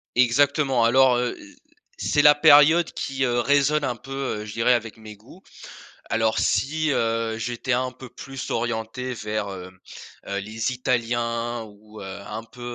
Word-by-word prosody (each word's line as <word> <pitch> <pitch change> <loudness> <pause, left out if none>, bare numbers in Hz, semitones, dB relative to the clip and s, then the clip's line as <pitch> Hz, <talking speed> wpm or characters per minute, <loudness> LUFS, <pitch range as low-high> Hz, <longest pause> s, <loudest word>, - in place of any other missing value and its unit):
Exactement. 135 +1 +3
Alors, 130 +1 +4
heu 125 0 -1
heu, - - -15 0.4
c'est 145 - +1
la 150 0 +7
période 150 +3 +6
qui, 135 -1 -3
heu, 120 0 0
résonne 145 +3 +2
un 125 -3 -1
peu, 135 - -14 0.3
heu, - - -7
je 105 - -8
dirais 115 +2 +3
avec 115 -2 -3
mes 110 -1 -11
goûts. 120 - -18 0.7
Alors 110 0 +1
si, 155 +2 0
heu, 115 -2 -1
j'étais 120 +2 -3
un 130 +1 0
peu 130 -2 -12
plus 135 -1 -8
orienté 115 +2 -3
vers, 105 -2 -4
hem, 95 -1 -9 0.5
heu, 100 - -3
les 110 +4 -3
Italiens, 120 -2 -2
ou 105 +1 -15
heu, - - -7
un 100 +3 -7
peu, 120 +2 -16
120 Hz, 165 wpm, -23 LUFS, 110-135 Hz, 0.7 s, la